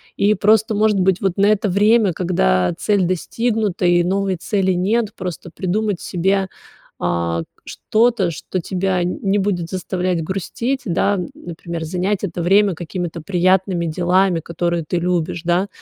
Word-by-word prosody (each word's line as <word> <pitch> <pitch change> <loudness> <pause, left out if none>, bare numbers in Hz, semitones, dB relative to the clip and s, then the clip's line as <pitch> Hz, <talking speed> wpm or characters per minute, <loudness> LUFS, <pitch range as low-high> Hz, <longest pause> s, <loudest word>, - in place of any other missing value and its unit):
и 205 +1 +3
просто 215 +2 +3
может 210 0 +2
быть 190 0 +2
вот 195 -3 0
на 200 - +4
это 210 0 +2
время, 210 +1 +3
когда 125 - +1
цель 205 -3 +2
достигнута, 210 +2 -1
и 175 0 +4
новой 195 0 0
цели 190 +1 0
нет, 205 +4 0
просто 180 -2 -6
придумать 200 +1 -1
себе, 190 +2 0 0.5
а, 85 0 -1
к - - -17 0.2
что-то, 220 -5 +1
что 180 +3 -4
тебя 185 +1 -1
нь 180 - -3
не 195 +1 +1
будет 185 -4 -1
заставлять 180 -1 -2
грустить, 230 +9 -3
да, 195 +1 +1 0.2
например, 170 -1 -7
занять 185 +4 -1
это 175 -3 -3
время 195 +2 +3
какими-то 170 0 -5
приятными 185 0 +1
делами, 180 +2 +2
которые 170 0 -2
ты - - -2
любишь, 170 -1 -1
да. 175 +3 +1
185 Hz, 150 wpm, -19 LUFS, 175-200 Hz, 0.5 s, на